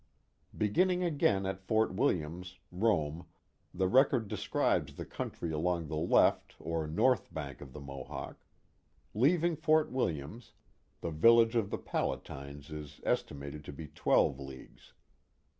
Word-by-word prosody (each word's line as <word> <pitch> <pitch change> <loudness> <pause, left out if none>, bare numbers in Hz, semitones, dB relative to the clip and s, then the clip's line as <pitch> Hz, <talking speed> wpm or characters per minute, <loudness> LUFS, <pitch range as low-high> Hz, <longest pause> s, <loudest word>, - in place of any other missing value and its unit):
Beginning 180 - +2
again 140 - +2
at 95 0 -3
Fort 110 0 +1
Williams, 90 - -1
Rome, 85 -5 0 0.4
the 95 +1 0
record 125 0 +4
describes - - 0
the - - -6
country 85 - -5
along 85 +2 0
the 80 - -3
left 75 - +3
or 80 -2 -3
north 105 +9 +2
bank 70 -4 -6
of 70 -2 -10
the 75 - -9
Mohawk: 70 -2 -8 0.7
Leaving 165 +8 +3
Fort 155 0 +2
Williams, 105 - -3 0.5
the 85 - -3
village 115 +8 +5
of 110 -4 +1
the - - -2
Palatines 70 +2 -4
is 75 -1 -8
estimated 70 +1 -2
to - - -6
be 75 +2 -9
twelve 70 +1 +2
leagues. 70 -1 -11
90 Hz, 130 wpm, -32 LUFS, 75-115 Hz, 0.7 s, village